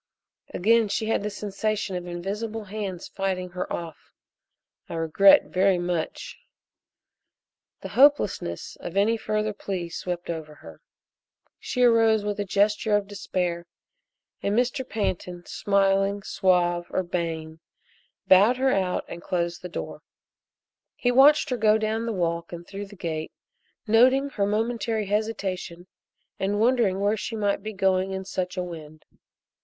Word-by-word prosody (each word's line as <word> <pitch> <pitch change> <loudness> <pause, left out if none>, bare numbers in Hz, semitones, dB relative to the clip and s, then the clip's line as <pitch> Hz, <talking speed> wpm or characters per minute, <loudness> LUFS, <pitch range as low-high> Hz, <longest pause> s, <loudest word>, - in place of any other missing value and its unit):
Again 225 +4 +3
she 210 +2 -1
had 225 - +1
the 210 - -2
sensation 205 -1 -3
of 180 0 -5
invisible 210 +6 -4
hands 195 -3 -5
fighting 185 -2 -3
her 180 0 -5
off. 165 -2 -7 0.7
"I - - -5
regret 165 +5 +5
very 190 0 +3
much 175 -2 -3 0.7
" - - -60
The - - -6
hopelessness 260 - +2
of 175 - -6
any 215 +3 +3
further 215 -1 -2
plea 185 -4 -4
swept 175 +1 -4
over 155 -2 -7
her. 80 - -14 0.8
She 250 - -1
arose 225 -3 +4
with 205 0 -2
a - - +1
gesture 210 +2 +2
of 205 -1 +1
despair, 180 -4 -3 0.7
and 200 +2 0
Mr. 250 +2 +1
Pantin, 180 -4 -3
smiling, 195 0 +1
suave, 175 -2 +1
urbane, 165 -3 -3 0.7
bowed 205 +7 +6
her 265 +1 +2
out 185 -2 0
and 170 - -8
closed 170 -2 -2
the 180 - -7
door. - - -6 0.9
He 245 - +1
watched 275 +3 +5
her 250 - 0
go 215 -1 +4
down 220 +1 -2
the - - -1
walk 170 -3 -2
and 170 0 -8
through 200 +2 -7
the 205 - -13
gate, 160 -4 -4 0.5
noting 255 +5 +4
her 200 -5 0
momentary 225 0 -1
hesitation 195 -4 -3 0.5
and 200 +2 0
wondering 225 -5 +2
where 205 +2 +2
she 225 - -4
might 205 -2 0
be 215 +2 -5
going 190 -1 +1
in 190 0 -4
such 185 -1 -4
a 180 - 0
wind. 155 -3 -10
195 Hz, 145 wpm, -25 LUFS, 175-215 Hz, 0.9 s, bowed